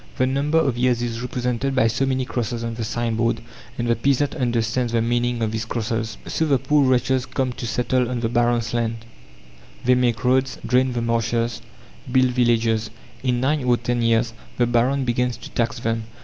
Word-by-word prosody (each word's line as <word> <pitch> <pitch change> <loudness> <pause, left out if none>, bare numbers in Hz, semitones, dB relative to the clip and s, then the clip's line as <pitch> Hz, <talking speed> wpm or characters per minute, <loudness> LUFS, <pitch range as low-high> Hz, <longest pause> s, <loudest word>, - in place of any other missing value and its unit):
The 130 - +3
number 140 +4 +1
of 135 -7 +1
years 125 -1 +2
is 115 -1 -3
represented 125 +1 -2
by - - +4
so 120 +4 +1
many 130 -1 0
crosses 120 -1 -3
on 115 0 -3
the 115 0 -4
sign 115 0 -2
board, 115 0 +1 0.4
and 120 - -1
the 120 - +3
peasant 140 +4 +1
understands 120 -2 0
the 115 - +3
meaning 120 0 0
of 110 - 0
these 110 0 -2
crosses. 110 -1 -3
So 160 - -1
the 140 -3 +4
poor 145 +3 +2
wretches 130 +1 +1
come 130 -1 -1
to 120 - -5
settle 125 +1 0
on 125 -2 -2
the 115 - +1
baron's 120 -1 +1
lands. 115 -1 -2 0.8
They 125 - +5
make 125 -1 +1
roads, 130 +1 +2
drain 125 0 +2
the 120 -1 -1
marshes, 115 0 0 0.5
build 130 -1 +4
villages. 115 -3 +2 0.3
In 125 -2 0
nine 145 +2 +1
or 125 -1 +3
ten 120 +1 -1
years 115 0 +2 0.2
the 120 - +3
baron 125 +3 +1
begins 125 0 0
to - - -11
tax 120 +1 -1
them. 115 -1 -2
120 Hz, 195 wpm, -22 LUFS, 115-130 Hz, 0.8 s, They